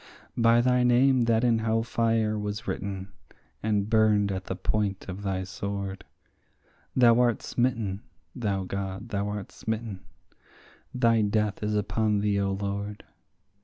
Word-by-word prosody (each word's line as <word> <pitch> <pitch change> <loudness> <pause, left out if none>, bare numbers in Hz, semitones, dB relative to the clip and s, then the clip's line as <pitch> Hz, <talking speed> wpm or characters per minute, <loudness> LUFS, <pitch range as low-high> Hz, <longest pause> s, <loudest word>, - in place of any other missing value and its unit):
By 115 0 +4
thy 125 0 +3
name 125 +1 +4
that 115 0 +2
in 115 -2 +3
hell 110 0 +1
fire 115 -2 +1
was 105 +2 -4
written, 95 0 -4 0.5
and 105 -2 0
burned 105 -2 +3
at 95 -1 -4
the 95 - -3
point 100 +1 -1
of 95 +1 -6
thy 95 -2 -2
sword, 100 0 -5 0.9
Thou 120 -2 +6
art 120 -3 +2
smitten, 115 -6 -1 0.3
thou 100 -5 -1
God, 100 +3 -5
thou 100 -1 -1
art 105 -1 -5
smitten; 110 -3 -4 0.9
thy 115 -3 +3
death 105 0 0
is 105 0 -1
upon 105 +1 +1
thee, 100 -1 +1
O 100 - 0
Lord. 100 +1 -4
105 Hz, 140 wpm, -27 LUFS, 100-115 Hz, 0.9 s, Thou